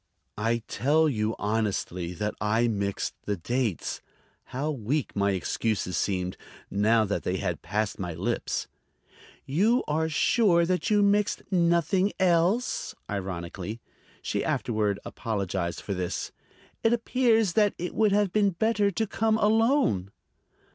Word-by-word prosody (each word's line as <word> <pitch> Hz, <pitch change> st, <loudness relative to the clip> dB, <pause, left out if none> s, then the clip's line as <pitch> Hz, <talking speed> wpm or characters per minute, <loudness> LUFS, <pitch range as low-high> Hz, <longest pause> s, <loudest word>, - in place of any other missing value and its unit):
"I 115 Hz, +1 st, 0 dB
tell 150 Hz, +7 st, +2 dB
you 110 Hz, -5 st, 0 dB
honestly 100 Hz, -5 st, -2 dB
that 105 Hz, +3 st, -2 dB
I 110 Hz, +3 st, +2 dB
mixed 100 Hz, -3 st, -2 dB
the 105 Hz, -1 st, -1 dB
dates." 120 Hz, +1 st, -2 dB, 0.4 s
How 140 Hz, +5 st, -3 dB
weak 140 Hz, +2 st, -2 dB
my 100 Hz, 0 st, +2 dB
excuses 95 Hz, 0 st, -1 dB
seemed, 90 Hz, 0 st, -1 dB, 0.3 s
now 110 Hz, +2 st, +3 dB
that 100 Hz, -, -1 dB
they 90 Hz, -, -1 dB
had 90 Hz, -4 st, -2 dB
passed 105 Hz, 0 st, -2 dB
my 90 Hz, -4 st, -4 dB
lips! -, -, -2 dB, 0.8 s
"You 210 Hz, -, +2 dB
are 160 Hz, +2 st, 0 dB
sure 170 Hz, +2 st, +3 dB
that 180 Hz, +1 st, 0 dB
you 210 Hz, -1 st, +4 dB
mixed 205 Hz, 0 st, +2 dB
nothing 175 Hz, +2 st, +2 dB
else?" 185 Hz, +6 st, +1 dB, 0.2 s
ironically. 95 Hz, +2 st, -4 dB, 0.4 s
(She -, -, -1 dB
afterward 105 Hz, -3 st, 0 dB
apologized 95 Hz, -5 st, -3 dB
for 100 Hz, -, -4 dB
this.) 90 Hz, -2 st, -3 dB, 0.5 s
"It 225 Hz, -, +4 dB
appears 230 Hz, -4 st, +2 dB
that 210 Hz, 0 st, +3 dB
it 175 Hz, +1 st, -4 dB
would 215 Hz, -2 st, +3 dB
have 200 Hz, -2 st, +2 dB
been 210 Hz, -2 st, +4 dB
better 205 Hz, +2 st, +1 dB
to 220 Hz, +3 st, -1 dB
come 220 Hz, +1 st, +1 dB
alone." 220 Hz, -, +2 dB
125 Hz, 135 wpm, -27 LUFS, -, 0.8 s, you